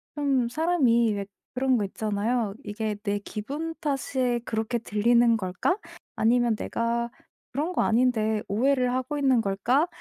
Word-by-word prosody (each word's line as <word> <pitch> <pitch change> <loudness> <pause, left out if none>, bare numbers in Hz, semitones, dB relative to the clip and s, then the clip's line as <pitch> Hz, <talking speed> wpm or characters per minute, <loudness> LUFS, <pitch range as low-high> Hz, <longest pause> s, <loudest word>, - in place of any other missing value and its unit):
좀 275 -4 +1
사람이 245 -8 +2
왜 200 -1 -3 0.3
그런 260 0 +2
거 210 - 0
있잖아요. 215 +2 -1
'이게 215 0 -3
내 205 -1 0
기분 280 +11 -5
탓에 260 -4 0
그렇게 225 +2 -1
들리는 235 +2 +3
걸까?' 190 - -1 0.4
아니면 235 0 +3
내가 235 +2 -1 0.4
'그런 305 +8 -2
거 - - +1
아닌데 220 -3 +2
오해를 250 +4 +2
하고 260 +3 -2
있는 265 -5 +3
걸까?' 235 - +1
235 Hz, 280 characters per minute, -26 LUFS, 215-265 Hz, 0.4 s, 들리는